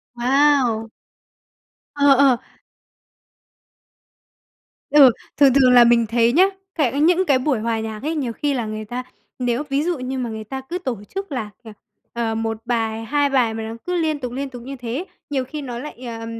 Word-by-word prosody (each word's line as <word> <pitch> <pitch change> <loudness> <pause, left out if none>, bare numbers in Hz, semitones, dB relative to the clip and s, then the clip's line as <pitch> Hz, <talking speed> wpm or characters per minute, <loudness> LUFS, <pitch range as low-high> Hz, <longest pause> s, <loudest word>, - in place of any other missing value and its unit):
Wow! 250 -3 +2 1.1
Ờ, 285 -1 +4
ờ. 270 -2 +4 2.5
Ừ, 280 -4 +8 0.3
thường 275 -2 +6
thường 260 -2 +5
là 245 -1 +8
mình 235 -1 +4
thấy 230 +1 +2
nhá, 350 +6 +6 0.3
cai 285 -3 +1
những 355 +4 +3
cái 275 -6 +3
buổi 260 -2 0
hòa 225 0 -1
nhạc 220 0 -6
ấy, 315 +3 -2
nhiều 260 -6 -2
khi 290 +4 -1
là 245 -4 -2
người 215 0 -5
ta, 245 +4 -5 0.4
nếu 245 +2 0
ví 275 +2 +1
dụ 340 -3 -1
như 255 +1 -4
mà 245 -2 -3
người 220 -1 -6
ta 265 +5 -6
cứ 300 +7 -5
tổ 260 - -4 0.2
chức 390 -3 -4
là 235 -6 -3
là, 220 -2 -11 0.4
ờ, 230 -1 -2
1 225 0 -2
bài, 225 -2 -1
2 290 +3 +1
bài 250 -5 +2
mà 220 0 -5
nó 220 +1 -6
cứ 360 - -2
liên 315 -3 0
tục, 250 -3 -5
liên 275 +2 -4
tục 245 -2 -10
như 270 +3 -7
thế, 250 +6 -5 0.2
nhiều 275 -3 -1
khi 300 +4 -7
nó 245 -4 -6
lại, 300 +4 -8
ờ, 225 -1 -6
255 Hz, 195 wpm, -21 LUFS, 230-285 Hz, 2.5 s, Ừ